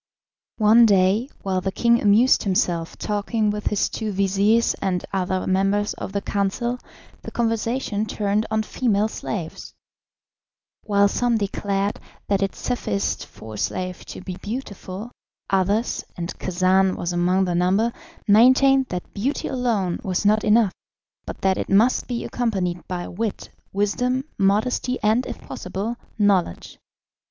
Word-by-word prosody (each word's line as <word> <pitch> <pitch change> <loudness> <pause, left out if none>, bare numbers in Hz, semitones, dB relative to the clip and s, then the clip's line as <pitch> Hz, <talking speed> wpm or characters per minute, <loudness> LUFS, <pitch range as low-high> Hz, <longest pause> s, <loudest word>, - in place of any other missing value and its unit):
One 225 +2 +6
day, 200 +5 +3
while 190 -1 0
the 190 - -2
king 235 +3 +3
amused 215 +5 +5
himself 175 -4 0
talking 210 +1 -1
with 210 0 -3
his 210 - +1
two 220 -2 -4
vizirs 200 +4 +2
and 180 -2 -1
other 185 -1 -1
members 195 +2 +1
of - - -6
the 200 0 -2
council, 235 +5 -1 0.4
the - - -7
conversation 230 -1 -1
turned 210 +1 0
on 220 0 0
female 215 -2 +1
slaves. 185 -6 -6 1.1
While 200 -1 +4
some 240 +3 +1
declared 200 -1 -1 0.3
that 200 -1 +1
it 195 -1 -1
sufficed 105 - -2
for 110 0 -11
a - - -7
slave 185 - -3
to - - -8
be 185 -1 -6
beautiful, 210 -2 -6 0.4
others, 200 +4 +1
and 170 0 -4
Khacan 185 +1 +2
was 175 0 -3
among 180 +2 +2
the 180 - -1
number, 190 +7 +2 0.4
maintained 260 +5 +5
that 180 -1 -6
beauty 255 +9 -2
alone 230 -9 0
was 190 +1 -1
not 215 +1 +4
enough, 215 -2 +4 0.6
but - - -7
that 190 -1 +2
it - - -3
must 220 +6 +3
be 240 -2 -3
accompanied 190 -8 -2
by 180 -1 -4
wit, 215 +3 -4 0.2
wisdom, 245 +6 0 0.2
modesty, 220 +6 +1
and, 220 +4 +2
if - - -6
possible, 195 +6 -4 0.2
knowledge. 195 - +1
205 Hz, 140 wpm, -23 LUFS, 190-230 Hz, 1.1 s, One